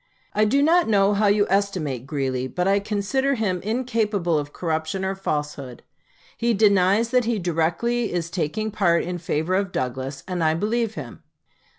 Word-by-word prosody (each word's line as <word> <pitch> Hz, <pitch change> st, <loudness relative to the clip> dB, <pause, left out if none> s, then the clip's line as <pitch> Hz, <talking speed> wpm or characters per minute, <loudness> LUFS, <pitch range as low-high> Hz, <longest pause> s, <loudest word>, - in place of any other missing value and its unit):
I 215 Hz, -, +3 dB
do 275 Hz, +7 st, +3 dB
not 340 Hz, +3 st, +4 dB
know 200 Hz, -1 st, +4 dB
how 205 Hz, +1 st, +2 dB
you 205 Hz, 0 st, +4 dB
estimate 175 Hz, -10 st, -1 dB
Greeley, 130 Hz, -3 st, -2 dB
but 180 Hz, +7 st, -2 dB
I 200 Hz, +1 st, +3 dB
consider 210 Hz, +7 st, 0 dB
him 190 Hz, -6 st, -1 dB
incapable 215 Hz, -6 st, 0 dB
of 145 Hz, 0 st, -6 dB
corruption 160 Hz, +3 st, -2 dB
or 190 Hz, -, -1 dB
falsehood. 150 Hz, -8 st, -4 dB, 0.5 s
He 235 Hz, -1 st, +1 dB
denies 200 Hz, +2 st, +3 dB
that 250 Hz, -2 st, +3 dB
he 235 Hz, -1 st, 0 dB
directly 180 Hz, +7 st, 0 dB
is 170 Hz, -1 st, -3 dB
taking 205 Hz, +6 st, -2 dB
part 175 Hz, -5 st, +2 dB
in 175 Hz, 0 st, -4 dB
favor 160 Hz, +1 st, -1 dB
of 195 Hz, 0 st, 0 dB
Douglas, 130 Hz, +1 st, -4 dB
and 180 Hz, -3 st, -2 dB
I 155 Hz, 0 st, +2 dB
believe 220 Hz, +4 st, -1 dB
him. -, -, -8 dB
195 Hz, 170 wpm, -23 LUFS, 160-215 Hz, 0.5 s, not